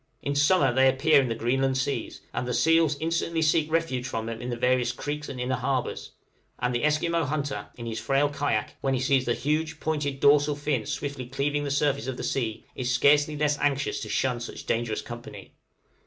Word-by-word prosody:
In 140 Hz, -, -1 dB
summer 145 Hz, -2 st, +3 dB
they 130 Hz, +1 st, +5 dB
appear 140 Hz, +2 st, +4 dB
in 130 Hz, -, -1 dB
the 115 Hz, -, -1 dB
Greenland 130 Hz, +3 st, +1 dB
seas, 135 Hz, +1 st, -3 dB
and 125 Hz, -, -2 dB
the 125 Hz, -, -1 dB
seals 160 Hz, -2 st, +3 dB
instantly 165 Hz, 0 st, 0 dB
seek 155 Hz, 0 st, +2 dB
refuge 145 Hz, -7 st, 0 dB
from 115 Hz, -4 st, -3 dB
them 115 Hz, 0 st, -5 dB
in 120 Hz, -, -4 dB
the 120 Hz, -, -2 dB
various 125 Hz, 0 st, +2 dB
creeks 150 Hz, +4 st, -5 dB
and 125 Hz, -, -6 dB
inner 125 Hz, +1 st, -1 dB
harbors; 130 Hz, 0 st, -2 dB, 0.4 s
and 125 Hz, 0 st, -1 dB
the 120 Hz, -, -1 dB
Esquimaux 165 Hz, +2 st, +1 dB
hunter 145 Hz, -1 st, -3 dB
in 120 Hz, -, -8 dB
his 115 Hz, -1 st, -4 dB
frail 135 Hz, +2 st, +2 dB
kayak, 145 Hz, 0 st, -2 dB
when 135 Hz, -1 st, +1 dB
he -, -, -1 dB
sees 130 Hz, 0 st, +2 dB
the 120 Hz, -, +1 dB
huge 155 Hz, +1 st, -1 dB
pointed 145 Hz, -3 st, -2 dB
dorsal 145 Hz, +1 st, +4 dB
fin 145 Hz, -6 st, -2 dB
swiftly 140 Hz, -3 st, -4 dB
cleaving 145 Hz, +3 st, -1 dB
the -, -, -2 dB
surface 140 Hz, -1 st, 0 dB
of 130 Hz, -1 st, -3 dB
the -, -, -5 dB
sea, 115 Hz, -5 st, -2 dB
is 125 Hz, -1 st, -2 dB
scarcely 145 Hz, +4 st, +4 dB
less 150 Hz, 0 st, +1 dB
anxious 140 Hz, -1 st, 0 dB
to -, -, -6 dB
shun 125 Hz, -2 st, 0 dB
such 120 Hz, -, -7 dB
dangerous 115 Hz, -1 st, -1 dB
company. 120 Hz, 0 st, -9 dB
140 Hz, 205 wpm, -26 LUFS, 125-150 Hz, 0.4 s, they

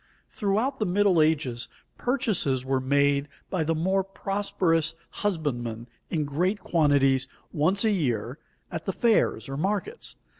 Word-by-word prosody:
Throughout 215 Hz, +6 st, 0 dB
the 215 Hz, -, +1 dB
Middle 185 Hz, -2 st, +4 dB
Ages 145 Hz, -7 st, +1 dB, 0.3 s
purchases 215 Hz, -, 0 dB
were 135 Hz, 0 st, +1 dB
made 140 Hz, +2 st, +2 dB, 0.2 s
by 185 Hz, -4 st, +1 dB
the 165 Hz, +1 st, 0 dB
more 190 Hz, +4 st, +1 dB
prosperous 195 Hz, -4 st, 0 dB, 0.3 s
husbandmen 120 Hz, -, -2 dB, 0.2 s
in 155 Hz, -4 st, 0 dB
great 180 Hz, +9 st, 0 dB
quantities 140 Hz, -4 st, +3 dB, 0.3 s
once 180 Hz, +6 st, +2 dB
a 220 Hz, -, +4 dB
year 125 Hz, -, -1 dB, 0.3 s
at 165 Hz, -, -5 dB
the 195 Hz, -, -1 dB
fairs 220 Hz, -, +2 dB
or 135 Hz, 0 st, -4 dB
markets. 205 Hz, -, -2 dB
165 Hz, 135 wpm, -26 LUFS, 140-195 Hz, 0.3 s, Middle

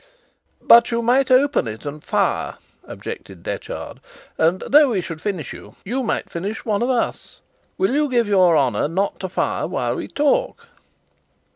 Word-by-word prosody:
"But 235 Hz, 0 st, +7 dB
you 235 Hz, 0 st, -1 dB
might 255 Hz, +3 st, +3 dB
open 265 Hz, -, +3 dB
it 110 Hz, +4 st, -7 dB
and 150 Hz, +1 st, -6 dB
fire," -, -, -1 dB, 0.3 s
objected -, -, -9 dB
Detchard; -, -, -6 dB, 0.4 s
"and 170 Hz, +3 st, +1 dB
though 295 Hz, 0 st, +6 dB
we 215 Hz, -6 st, 0 dB
should 165 Hz, -3 st, -6 dB
finish 180 Hz, -9 st, -4 dB
you, -, -, -13 dB
you 250 Hz, +7 st, -2 dB
might 235 Hz, -, -2 dB
finish 195 Hz, +6 st, -5 dB
one 210 Hz, -2 st, 0 dB
of 245 Hz, -, 0 dB
us. 245 Hz, -3 st, -2 dB, 0.4 s
Will 380 Hz, -, +1 dB
you 295 Hz, +2 st, +1 dB
give 240 Hz, -3 st, +1 dB
your 185 Hz, -5 st, +4 dB
honour 135 Hz, -1 st, +1 dB
not 190 Hz, +6 st, -2 dB
to 190 Hz, -, -4 dB
fire -, -, -1 dB
while -, -, -2 dB
we -, -, -5 dB
talk?" 300 Hz, -, 0 dB
220 Hz, 165 wpm, -21 LUFS, 170-260 Hz, 0.4 s, But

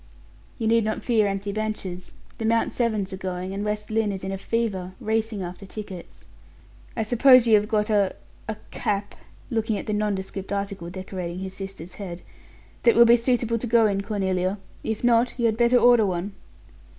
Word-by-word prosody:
"You 225 Hz, -, -1 dB
need 230 Hz, 0 st, +4 dB
not 215 Hz, +1 st, -2 dB
fear 220 Hz, -4 st, +3 dB
empty 200 Hz, +1 st, -2 dB
benches. 200 Hz, -4 st, -4 dB, 0.3 s
The 225 Hz, -, -2 dB
Mount 230 Hz, +1 st, +2 dB
Severns 215 Hz, -5 st, -1 dB
are -, -, -4 dB
going, 185 Hz, 0 st, -4 dB
and 200 Hz, +1 st, -3 dB
West 210 Hz, +1 st, -3 dB
Lynne 220 Hz, -1 st, +1 dB
is 190 Hz, -1 st, -5 dB
in 190 Hz, -, -3 dB
a 195 Hz, -, -3 dB
fever, 195 Hz, -5 st, -2 dB
racing 220 Hz, -2 st, -1 dB
after 180 Hz, +3 st, -8 dB
tickets. 190 Hz, -3 st, -9 dB, 0.7 s
I 225 Hz, -, +1 dB
suppose 250 Hz, +2 st, +6 dB
you 230 Hz, -, +4 dB
have 210 Hz, 0 st, +5 dB
got 210 Hz, 0 st, 0 dB
a 200 Hz, -3 st, +2 dB, 0.3 s
a 220 Hz, -, -2 dB, 0.2 s
cap," 205 Hz, -3 st, -2 dB, 0.4 s
looking 225 Hz, -2 st, 0 dB
at -, -, -6 dB
the 215 Hz, -, -2 dB
nondescript 200 Hz, -2 st, -2 dB
article 200 Hz, -3 st, -3 dB
decorating 185 Hz, -1 st, -5 dB
his 190 Hz, 0 st, -5 dB
sister's 190 Hz, -3 st, -7 dB
head, 180 Hz, -3 st, -7 dB, 0.6 s
"that 235 Hz, -, +5 dB
will 235 Hz, -, +8 dB
be 235 Hz, +1 st, +7 dB
suitable 235 Hz, -1 st, +1 dB
to 245 Hz, -, -2 dB
go 230 Hz, 0 st, +5 dB
in, 200 Hz, -2 st, +1 dB
Cornelia; 190 Hz, -2 st, -1 dB, 0.3 s
if 220 Hz, +1 st, -3 dB
not 240 Hz, 0 st, +3 dB
you 235 Hz, -, 0 dB
had 220 Hz, -1 st, +3 dB
better 240 Hz, +2 st, +4 dB
order 240 Hz, -3 st, +5 dB
one." 185 Hz, +2 st, -3 dB
210 Hz, 185 wpm, -25 LUFS, 190-225 Hz, 0.7 s, will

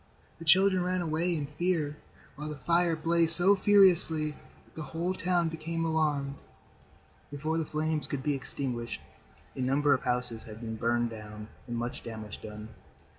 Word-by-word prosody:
The 165 Hz, -, -9 dB
children 185 Hz, +3 st, +5 dB
ran 180 Hz, 0 st, -1 dB
away 170 Hz, +2 st, -1 dB
in 150 Hz, -3 st, -2 dB
fear 150 Hz, 0 st, -1 dB, 0.4 s
while 150 Hz, +2 st, -6 dB
the 150 Hz, -, -6 dB
fire 170 Hz, +4 st, +1 dB
blazed 165 Hz, +1 st, +4 dB
so 190 Hz, +3 st, +6 dB
furiously 180 Hz, -6 st, +5 dB
that -, -, -20 dB
the 160 Hz, -, -7 dB
whole 165 Hz, +4 st, -3 dB
town 175 Hz, -2 st, 0 dB
became 165 Hz, +1 st, -3 dB
alarmed. 150 Hz, -4 st, 0 dB, 0.9 s
Before 155 Hz, +3 st, -2 dB
the 160 Hz, -, -2 dB
flames 155 Hz, 0 st, -2 dB
could 135 Hz, -2 st, -4 dB
be 150 Hz, -, +1 dB
extinguished, 125 Hz, -3 st, -4 dB, 0.5 s
a 130 Hz, -, -4 dB
number 140 Hz, +3 st, +2 dB
of 130 Hz, -, 0 dB
houses 125 Hz, -2 st, -2 dB
had 110 Hz, 0 st, -11 dB
been 110 Hz, -1 st, -5 dB
burned 120 Hz, +1 st, 0 dB
down 105 Hz, -1 st, -9 dB, 0.2 s
and 120 Hz, -1 st, -4 dB
much 120 Hz, +1 st, -4 dB
damage 110 Hz, -3 st, -8 dB
done. 105 Hz, 0 st, -9 dB
150 Hz, 165 wpm, -29 LUFS, 125-170 Hz, 0.9 s, so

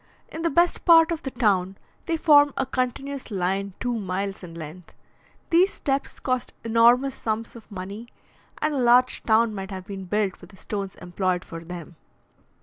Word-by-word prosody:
In 320 Hz, -, -6 dB
the 335 Hz, -, +1 dB
best 345 Hz, +4 st, +2 dB
part 330 Hz, -1 st, +6 dB
of 330 Hz, -1 st, -2 dB
the 270 Hz, -, -4 dB
town, 195 Hz, -6 st, +1 dB, 0.3 s
they 330 Hz, -1 st, 0 dB
form 290 Hz, -3 st, +5 dB
a 270 Hz, -, +1 dB
continuous 260 Hz, +2 st, -3 dB
line 195 Hz, 0 st, -2 dB
two 245 Hz, -1 st, -1 dB
miles 195 Hz, 0 st, -3 dB
in 170 Hz, -3 st, -10 dB
length. 165 Hz, +2 st, -10 dB, 0.6 s
These 360 Hz, +4 st, +4 dB
steps 275 Hz, 0 st, -2 dB
cost 255 Hz, -2 st, -2 dB
enormous 235 Hz, +4 st, +4 dB
sums 225 Hz, +1 st, -3 dB
of 230 Hz, -1 st, -14 dB
money, 200 Hz, +4 st, -7 dB, 0.6 s
and 305 Hz, -, +1 dB
a 280 Hz, -, -1 dB
large 250 Hz, +1 st, +4 dB
town 225 Hz, 0 st, +3 dB
might 195 Hz, -1 st, -6 dB
have 190 Hz, -2 st, -7 dB
been 195 Hz, -1 st, -7 dB
built 205 Hz, 0 st, -1 dB
with 175 Hz, -, -13 dB
the 190 Hz, -, -17 dB
stones 200 Hz, -2 st, -5 dB
employed 180 Hz, 0 st, -2 dB
for 165 Hz, -1 st, -8 dB
them. 170 Hz, -1 st, -9 dB
220 Hz, 175 wpm, -25 LUFS, 190-270 Hz, 0.6 s, part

